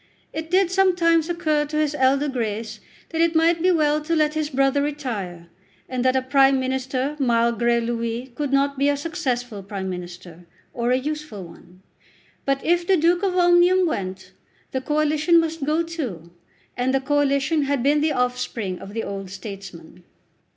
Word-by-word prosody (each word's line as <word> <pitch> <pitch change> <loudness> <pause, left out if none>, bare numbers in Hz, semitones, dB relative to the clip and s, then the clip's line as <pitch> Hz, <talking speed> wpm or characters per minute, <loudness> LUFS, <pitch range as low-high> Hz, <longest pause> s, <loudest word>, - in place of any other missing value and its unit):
It 320 0 -5
did 365 0 +3
sometimes 350 -4 +3
occur 315 -4 +1
to 300 +1 -4
his 305 -1 +1
elder 275 +1 +2
Grace 225 -4 -3 0.3
that 325 -1 -1
it 335 0 +2
might 330 +1 +3
be 365 - +3
well 305 -3 +2
to 330 +2 -1
let 305 -1 +2
his 310 -1 -2
brother 275 0 +2
retire, 230 - -4 0.4
and 255 -1 -2
that 260 0 +3
a 260 - +1
Prime 270 0 +4
Minister, 260 +2 -2
malgré 235 -1 +2
lui, 235 +2 -3
could 285 +2 -3
not 275 0 +1
be 280 +1 +3
a 285 - +1
successful 255 - -3
Prime 195 -1 -5
Minister, 175 -1 -9 0.3
or 240 0 -1
a 250 - +3
useful 300 -7 -5
one. 175 +2 -16 0.6
But 275 0 -1
if 345 +1 +2
the 385 - +4
Duke 340 +2 +2
of 380 -2 0
Omnium 355 +1 +5
went 190 - -4 0.4
the 260 - -2
Coalition 305 +4 +2
must 325 -2 -2
go 310 +3 +1
too, 245 - -6 0.4
and 255 +2 0
the - - +3
Coalition 285 +2 +1
had 280 -3 0
been 290 +2 +3
the 310 0 +2
offspring 245 -7 -2
of 200 +2 -10
the 225 - -2
old 195 -1 -6
statesman. 190 -3 -10
275 Hz, 170 wpm, -23 LUFS, 235-310 Hz, 0.6 s, Omnium